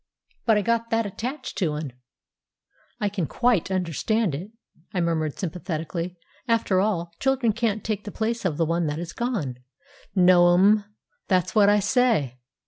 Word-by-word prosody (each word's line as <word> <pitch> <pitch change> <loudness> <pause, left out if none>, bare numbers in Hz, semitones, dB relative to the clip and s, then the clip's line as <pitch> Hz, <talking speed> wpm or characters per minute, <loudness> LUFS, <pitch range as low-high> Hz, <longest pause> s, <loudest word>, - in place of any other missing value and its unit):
But 220 -2 +5
I 210 - +1
got 230 +1 0
that 225 -1 +1
attached 245 +8 -5
to 165 -6 +1
'un." 150 -4 -5 1.1
"I 205 - 0
can 195 -6 -2
quite 240 -8 +1
understand 190 +2 0
it," 175 +9 -5 0.5
I - - +1
murmured 160 -3 -1
sympathetically. 170 0 -4 0.3
"After 225 -5 +2
all, 175 -5 -1
children 265 -4 +2
can't 220 -2 -1
take 215 -2 -2
the 205 - -5
place 230 +2 -2
of 170 -6 -1
the 165 - +2
one 165 0 0
that 150 0 -2
is 165 0 -6
gone." 190 - -3 0.6
"No, 175 -1 +6
m'm; 205 +2 +4 0.4
that's 185 -2 +1
what 205 -2 +5
I 205 0 +4
say." 205 - +1
190 Hz, 160 wpm, -25 LUFS, 170-220 Hz, 1.1 s, No